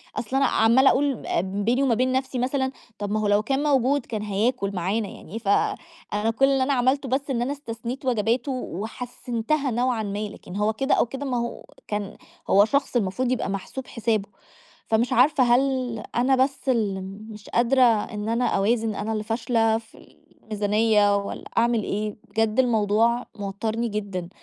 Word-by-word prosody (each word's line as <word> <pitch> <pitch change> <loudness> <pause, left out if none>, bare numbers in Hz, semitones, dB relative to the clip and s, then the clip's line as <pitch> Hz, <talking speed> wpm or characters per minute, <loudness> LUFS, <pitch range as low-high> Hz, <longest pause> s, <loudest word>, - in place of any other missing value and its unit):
أصل 240 +3 -3
أنا 275 - +4
عمّالة 235 +5 +5
أقول 275 -3 0
آآ - - +1
بيني 205 +8 0
وما 255 -4 +3
بين 255 +3 +1
نَفْسي 260 0 -1
مثلًا، 265 +1 0 0.3
طَب 205 -1 -3
ما 215 - +1
هو 210 - 0
لو 205 +1 +3
كان 270 +4 0
موجود، 280 -2 +2
كان 220 -3 -4
هياكل 210 +1 0
معانا 195 +5 -1
يعني. 210 +8 -8
ف 225 - -11 0.7
أنا 210 +2 +1
كل 270 - +5
اللي 270 -1 +2
أنا 280 +2 +1
عملته 265 +2 +1
بس 275 +3 -1
إن 240 - 0
أنا 250 +3 -1
استثنيت 245 -1 -6
وجباته 240 +2 +1
وحسِّنتها 245 - -3
نوعًا 240 -1 0
ما، 200 0 -3
لكن 185 -2 -11
هو 210 +2 +1
كده 270 +5 +1
أو - - +3
كده 270 +4 -6
ما 250 -3 -1
هو 235 0 -4 0.2
كان 210 0 -4 0.3
هو 200 +1 +6
شخص 280 +3 0
المفروض 240 +3 0
يبقى 250 - -1
محسوب 200 +7 -5
حسابه. 220 -3 -1 0.6
فمش 225 +2 +1
عارفة 265 +2 +4
هل 250 -1 +1 0.2
أنا 255 +3 +3
بس 270 +1 0
اللي 210 -6 +1 0.3
مش 210 -1 -11
قادرة 245 +3 +3
إن 215 -2 +2
أنا 230 +2 +1
أوازن، 220 +2 +1
أنا 215 +2 -3
اللي 215 -1 -2
فاشلة 225 0 +1
في 225 0 -18 0.3
الميزانيّة 210 -1 +2
والّا 200 0 -5
أعمل 235 -1 +2
إيه؟ 210 +1 -3
بجد 225 +1 0
الموضوع 230 0 +2
موتّرني 215 +3 -2
جدًا 200 -5 -4
230 Hz, 175 wpm, -24 LUFS, 210-255 Hz, 0.7 s, هو